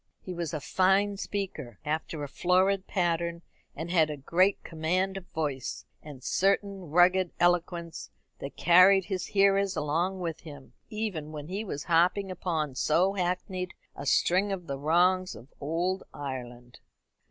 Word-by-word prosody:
He 185 - -7
was 170 -3 -3
a 155 - -3
fine 195 +5 +2
speaker, 180 - -5
after 155 0 -3
a - - -3
florid 185 +5 +1
pattern, 170 -1 -1 0.3
and 165 +3 -5
had 160 -4 +4
a 150 - -4
great 180 +8 +2
command 180 +4 -1
of 190 -2 -7
voice, 145 -5 -4 0.2
and 145 -4 -11
a - - -20
certain 195 -2 0
rugged 180 +3 +4
eloquence 175 -1 0 0.3
that 140 - -7
carried 185 +2 +6
his 185 -1 -3
hearers 195 -1 +3
along 170 +6 -1
with 165 -3 -4
him, 145 -4 -12 0.2
even 200 -9 -4
when 150 0 -7
he 200 +4 -3
was 145 -9 -5
harping 180 +3 +2
upon 160 -6 -2
so 170 +8 +2
hackneyed 180 0 -3 0.2
a 140 - -7
string 185 +8 +3
as 190 -2 -3
the 140 -4 -5
wrongs 180 +5 +2
of 120 +6 -14
"Ould 175 +6 -1
Ireland." 125 -3 -7
175 Hz, 155 wpm, -28 LUFS, 155-190 Hz, 0.3 s, carried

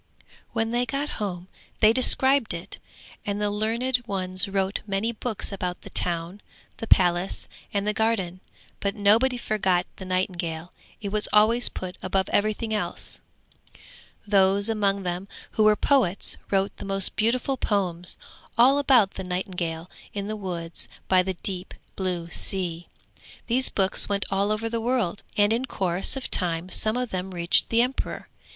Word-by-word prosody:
When 225 0 -1
they 245 +1 0
got 280 +2 -2
home 180 -3 -4 0.3
they 220 0 +6
described 260 -3 +4
it, 170 +2 -7 0.4
and 205 0 -3
the 210 0 0
learned 230 +5 0
ones 185 0 +1
wrote 195 0 -1
many 200 +3 -1
books 225 -2 -4
about 180 -2 -4
the - - -11
town, 175 +3 -1 0.4
the 225 - -6
palace 175 -1 +2 0.2
and 200 0 -1
the 210 - +1
garden; 205 -5 0 0.4
but 200 +1 -2
nobody 225 +5 +3
forgot 190 -6 +1
the 190 - -8
nightingale, 175 -3 -3 0.3
it 200 - -3
was 210 +1 +1
always 225 +3 +5
put 185 -1 -7
above 190 +1 -1
everything 215 +2 0
else. 210 - -1 1.1
Those 200 0 +3
among 200 -3 +1
them 180 +2 -3 0.2
who 215 - +2
were 215 0 +6
poets 210 -6 +2
wrote 195 0 0
the - - -8
most 195 -1 -2
beautiful 245 +5 +1
poems, 180 -7 0 0.4
all 265 +4 +5
about 250 -8 +4
the 190 - -7
nightingale 180 -2 -4 0.3
in 200 -1 -3
the 215 +1 -4
woods 175 -5 -4 0.2
by 185 -1 +4
the 190 0 -3
deep 185 +1 -5 0.2
blue 180 -3 -3
sea. 175 -3 -2 0.6
These 250 +2 +4
books 190 0 +3
went 200 -1 0
all 200 +2 +1
over 215 +2 -1
the 230 0 -2
world, 225 -6 -1 0.2
and 205 +1 +4
in 240 +3 -1
course 190 -1 +1
of 265 - -6
time 175 0 +1
some 215 +5 +3
of 250 -1 -2
them 185 0 -3
reached 170 0 +3
the 230 +1 +4
emperor. 255 +2 -4
200 Hz, 160 wpm, -25 LUFS, 185-225 Hz, 1.1 s, they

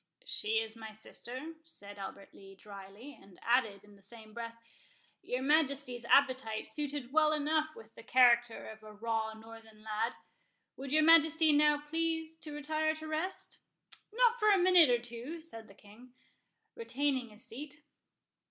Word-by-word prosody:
"She 220 - -1
is 220 0 -5
my 220 -1 -9
sister," 255 +7 -6
said 205 -11 -11
Albert 195 0 -9
Lee, 195 0 -14
dryly, 200 +6 -11
and 195 -2 -18
added, 230 -5 +1
in 205 0 -18
the - - -22
same 215 +2 -13
breath, 230 0 -7 0.6
"Your 250 +1 -3
Majesty's 280 -4 +1
appetite 260 -5 +2
suited 285 +1 -4
well 310 -1 +4
enough 310 +1 0
with 225 0 -14
the - - -12
character 240 -1 +4
of 220 0 -11
a 215 0 -12
raw 220 0 -2
northern 220 -1 -14
lad.—Would 225 +4 -7
your 310 +1 +4
Majesty 320 -1 +6
now 295 0 +3
please 325 0 -2
to 315 -2 -8
retire 310 +1 -1
to 315 0 -8
rest?" 315 +5 -3 0.5
"Not 485 +1 +3
for 425 - +4
a 405 - +6
minute 360 -4 +6
or 245 - +4
two," 240 +7 -7
said 230 -9 -10
the 195 - -17
King, 235 +6 -17 0.6
retaining 275 - -1
his 210 0 -6
seat. 290 +5 -9
250 Hz, 155 wpm, -32 LUFS, 220-310 Hz, 0.6 s, Majesty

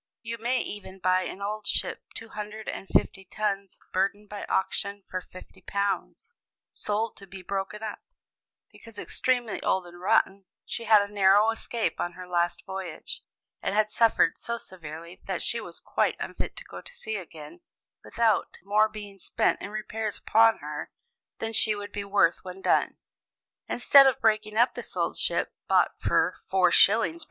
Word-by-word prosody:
"You 230 0 -5
may 245 +3 +1
even 195 -2 -7
buy 185 0 +2
an 200 - -6
old 210 +1 -3
ship - - -1
two 225 - -8
hundred 215 +1 -7
and 195 - -5
fifty 195 - +1
tons 200 0 -3 0.2
burden 200 +2 0
by 205 0 -7
auction 200 +1 -1
for 185 - -4
£50, 200 - -4 0.4
sold 215 +2 -2
to 195 - -12
be 190 0 -10
broken 195 +3 -4
up, 215 -2 -4 0.7
because 230 -2 -13
extremely 245 0 -1
old 190 -1 +1
and 175 0 -13
rotten; 195 +1 +2 0.2
she 230 - -5
had 210 -2 +6
a 200 +1 -8
narrow 205 +2 +5
escape 225 0 -2
on 175 - -2
her 180 0 -9
last 175 -1 0
voyage, 190 -4 -6 0.4
and - - -1
had 215 0 +2
suffered 230 +1 +3
so 235 0 -3
severely 170 -4 -10
that - - 0
she - - +2
was - - -7
quite - - 0
unfit - - -5
to - - -8
go - - -10
to - - -11
sea 220 - -4
again 165 - -10 0.4
without 225 -3 +1
more 210 +2 +3
being 205 -2 -9
spent - - 0
in - - -5
repairs 215 0 -3
upon 225 0 +4
her - - -5 0.5
than 225 0 -4
she 215 -1 +6
would 205 0 -7
be 205 - -4
worth 200 -4 +2
when 185 0 -8
done. - - +2 0.7
Instead 275 +3 +7
of 265 - +2
breaking 215 -1 +1
up 240 +2 +4
this - - -8
old - - 0
ship, - - 0
bought - - +4
for - - +2
4s. 195 - +4
205 Hz, 165 wpm, -27 LUFS, 190-220 Hz, 0.7 s, Instead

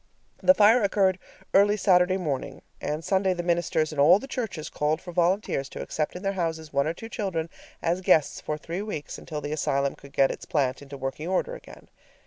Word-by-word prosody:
The 275 - +6
fire 220 +4 +6
occurred 195 -2 +2 0.3
early 205 +2 +5
Saturday 185 -2 +4
morning, 150 -8 -4 0.2
and 150 +2 -3
Sunday 190 -1 +2
the 175 - -3
ministers 170 -2 0
in 145 - -5
all 160 +6 +7
the 240 - -8
churches 205 - -4
called 150 +2 -1
for 175 - -9
volunteers 175 -5 0
to - - -7
accept 155 +1 -3
in 180 - -7
their 195 0 0
houses 160 -4 -3
one 140 +1 +2
or 160 - 0
two 225 - -8
children 180 -8 -3 0.3
as 175 +3 0
guests 155 -5 +3
for 150 - -3
three 170 +5 -5
weeks, 205 -9 -5
until 150 -2 -6
the 145 +1 -5
asylum 140 -2 0
could 140 0 -15
get 135 -1 +3
its - - -8
plant 135 -3 0
into 140 0 -9
working 135 +4 -4
order 190 - 0
again. - - -12
170 Hz, 205 wpm, -26 LUFS, 150-190 Hz, 0.3 s, all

